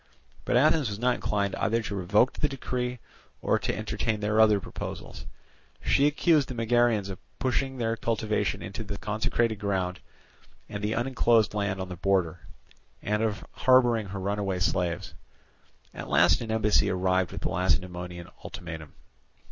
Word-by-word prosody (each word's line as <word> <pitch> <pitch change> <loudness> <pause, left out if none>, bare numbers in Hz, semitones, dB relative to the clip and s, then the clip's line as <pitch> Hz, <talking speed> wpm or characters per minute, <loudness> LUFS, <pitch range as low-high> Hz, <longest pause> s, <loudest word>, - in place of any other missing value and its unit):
But - - +2
Athens 150 -1 +4
was 100 - -4
not 125 +3 +2
inclined 100 -4 -1
either 115 +1 +1
to 100 - -4
revoke 100 +6 +3
the 150 - 0
decree, 125 -2 -3 0.4
or - - +1
to - - -2
entertain 110 -2 -2
their 105 +1 +2
other 105 -2 +5
proposals; - - -7 0.5
she 140 - +3
accused 150 -1 +3
the 130 - -6
Megarians 115 -3 +2
of 95 - -7 0.2
pushing 135 +1 -1
their 115 -2 0
cultivation 105 -6 -1
into 95 +4 -6
the 100 -1 -5
consecrated 110 +2 0
ground 95 -3 -1 0.7
and 100 0 -6
the 105 +2 0
unenclosed 120 -3 +2
land 100 -2 -1
on 95 0 -4
the 90 - -5
border, 90 -3 +1 0.6
and 105 +1 0
of 110 -2 -1
harbouring 120 -4 +3
her 100 +1 -5
runaway 100 -1 -1
slaves. 90 -1 -1 0.8
At - - -7
last 80 - +4
an 115 - -5
embassy 105 -2 +3
arrived 95 -1 +1
with - - -6
the - - -1
Lacedaemonian 90 0 -1 0.2
ultimatum. 80 -3 -8
105 Hz, 155 wpm, -27 LUFS, 95-115 Hz, 0.8 s, other